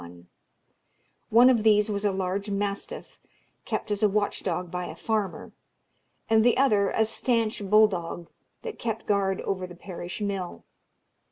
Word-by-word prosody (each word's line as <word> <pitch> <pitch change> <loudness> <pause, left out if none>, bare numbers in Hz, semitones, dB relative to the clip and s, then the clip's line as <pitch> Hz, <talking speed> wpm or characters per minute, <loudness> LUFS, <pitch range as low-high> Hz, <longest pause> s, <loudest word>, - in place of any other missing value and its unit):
One 235 +3 +7
of 235 -4 +2
these 210 0 +4
was 200 0 -2
a 205 - +2
large 190 +2 -2
mastiff, 200 0 -4 0.5
kept - - -3
as 205 - -1
a 210 - +4
watch 205 +1 -1
dog 180 -1 -3
by 180 0 -3
a - - -8
farmer, 215 -3 -2 0.8
and 220 0 +4
the 240 0 +4
other 210 -7 +3
a 220 - +2
stanch 225 -2 0
bull 215 +1 +7
dog, 170 -3 -5 0.4
that 460 -2 -6
kept 225 -1 -3
guard 195 -2 +1
over 185 -2 -3
the 175 - -11
parish 175 0 -7
mill. 195 -4 -4
205 Hz, 155 wpm, -26 LUFS, 190-220 Hz, 0.8 s, One